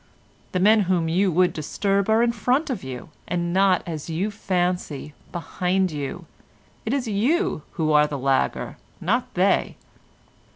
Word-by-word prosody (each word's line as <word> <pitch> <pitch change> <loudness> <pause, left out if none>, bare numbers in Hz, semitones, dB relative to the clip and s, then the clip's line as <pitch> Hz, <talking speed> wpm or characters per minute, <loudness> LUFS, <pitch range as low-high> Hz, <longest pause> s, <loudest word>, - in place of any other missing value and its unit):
The 185 - 0
men 215 +4 +5
whom 175 -3 +2
you 185 +4 +2
would 180 +2 +3
disturb 195 +6 -1
are 220 +2 +4
in 240 - +3
front 255 +7 0
of 225 - -4
you, 130 +2 -7 0.2
and 175 0 -1
not, 190 -2 +3
as 160 -2 -5
you 180 +6 -1
fancy, 180 -7 -2 0.2
behind 180 +2 -1
you; 145 -3 -5 0.6
it - - +1
is 265 -3 -1
you 245 - +1
who 155 -1 0
are 150 0 +5
the 145 - -4
lagger, 135 0 0 0.2
not - - 0
they." - - +2
180 Hz, 155 wpm, -24 LUFS, 160-210 Hz, 0.6 s, men